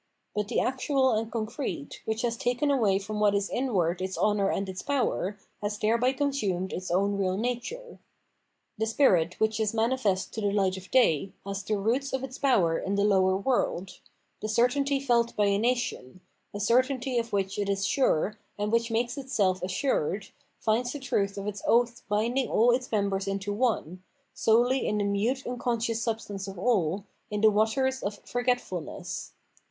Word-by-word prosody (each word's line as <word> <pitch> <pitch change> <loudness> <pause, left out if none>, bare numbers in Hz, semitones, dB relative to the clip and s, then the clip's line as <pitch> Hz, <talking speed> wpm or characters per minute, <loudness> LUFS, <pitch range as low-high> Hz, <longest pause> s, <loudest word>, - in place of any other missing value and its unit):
But 210 -1 -1
the 240 - 0
actual 260 0 +1
and 220 0 -1
concrete, 220 - -4
which 220 +1 -2
has 235 -1 0
taken 245 +5 0
away 215 -8 +3
from 210 +2 -4
what 205 -1 +3
is 200 0 -1
inward 185 -9 0
its 185 0 -3
honour 205 -2 +2
and 195 - -1
its 185 0 -5
power, 250 -8 -1 0.2
has 210 0 -2
thereby 235 +4 +2
consumed 215 -11 -1
its 185 +1 -4
own 200 +3 +1
real 185 -1 0
nature. 250 - -4 0.8
The 220 - +1
spirit 185 - +3
which 220 0 +1
is 220 0 0
manifest 225 -4 0
to 220 - -4
the 205 -1 +1
light 195 -2 +1
of 190 0 -10
day 195 - +3
has 200 0 -3
the 210 +2 -1
roots 245 +8 0
of 265 0 -1
its 265 0 -7
power 190 -12 +3
in 195 +1 -2
the 200 - +2
lower 190 -2 +3
world: 195 -5 -1 0.4
the 215 - -3
certainty 275 +5 +2
felt 235 -3 +1
by 210 - +3
a 200 0 +2
nation, 225 - -1 0.3
a 205 - -6
certainty 255 +3 +2
of 230 -1 -4
which 195 -1 -1
it 200 -1 -1
is 195 0 0
sure 210 - +1 0.2
and 210 +1 -1
which 230 0 +2
makes 235 +3 -1
itself 205 -9 0
assured, 190 - -1 0.3
finds 240 +3 0
the 290 - -5
truth 200 -6 -1
of 200 - -4
its 205 -1 -4
oath 235 0 +3
binding 235 +6 +1
all 235 +3 +4
its 250 +1 -1
members 200 -2 0
into 195 +1 -2
one, 205 -6 -1 0.3
solely 245 +4 +3
in 210 - 0
the 205 - +1
mute 215 +7 0
unconscious 235 -2 -1
substance 210 -4 -3
of 195 -1 -7
all, 195 -3 +1 0.2
in 210 -1 -2
the 220 0 +6
waters 245 +5 +1
of 205 +1 -3
forgetfulness. 245 -9 -3
215 Hz, 180 wpm, -28 LUFS, 195-245 Hz, 0.8 s, the